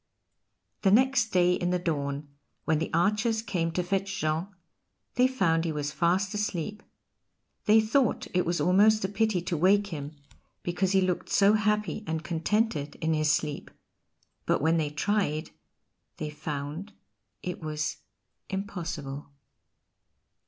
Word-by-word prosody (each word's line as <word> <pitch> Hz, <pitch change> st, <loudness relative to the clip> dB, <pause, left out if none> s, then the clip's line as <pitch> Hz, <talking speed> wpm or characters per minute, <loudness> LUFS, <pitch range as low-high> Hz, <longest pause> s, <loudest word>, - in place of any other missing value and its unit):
The 195 Hz, -, +4 dB
next 250 Hz, +2 st, +4 dB
day 180 Hz, -2 st, +3 dB
in 175 Hz, 0 st, -1 dB
the 180 Hz, -, +2 dB
dawn, 145 Hz, -4 st, -2 dB, 0.4 s
when 155 Hz, -1 st, +2 dB
the 160 Hz, -, -3 dB
archers 210 Hz, +6 st, +1 dB
came 175 Hz, -6 st, -1 dB
to 180 Hz, -, 0 dB
fetch 195 Hz, +1 st, -2 dB
Jean, 155 Hz, +3 st, 0 dB, 0.7 s
they 250 Hz, +1 st, +4 dB
found 170 Hz, -11 st, +1 dB
he 165 Hz, -, -1 dB
was 150 Hz, -1 st, -3 dB
fast 180 Hz, +6 st, +1 dB
asleep. 210 Hz, 0 st, -3 dB, 0.8 s
They 215 Hz, +1 st, +6 dB
thought 225 Hz, +2 st, +1 dB
it 180 Hz, 0 st, +3 dB
was 170 Hz, +1 st, -1 dB
almost 205 Hz, +3 st, +4 dB
a -, -, +1 dB
pity 205 Hz, -2 st, 0 dB
to 175 Hz, -1 st, -2 dB
wake 195 Hz, +5 st, +4 dB
him, 145 Hz, 0 st, -6 dB, 0.5 s
because 180 Hz, +2 st, 0 dB
he 190 Hz, -, +4 dB
looked 185 Hz, -1 st, -1 dB
so 200 Hz, +1 st, +5 dB
happy 210 Hz, 0 st, 0 dB
and 160 Hz, 0 st, -2 dB
contented 170 Hz, -2 st, 0 dB
in 160 Hz, 0 st, -1 dB
his 155 Hz, -1 st, +2 dB
sleep; 150 Hz, -1 st, -2 dB, 0.8 s
but -, -, +3 dB
when 160 Hz, +3 st, +2 dB
they 155 Hz, -2 st, 0 dB
tried 155 Hz, -1 st, -1 dB, 0.7 s
they 150 Hz, -1 st, -4 dB
found 150 Hz, +6 st, -5 dB, 0.5 s
it 180 Hz, -1 st, -5 dB
was 155 Hz, -1 st, -3 dB, 0.5 s
impossible. 165 Hz, -8 st, -5 dB
180 Hz, 140 wpm, -28 LUFS, 155-205 Hz, 0.8 s, They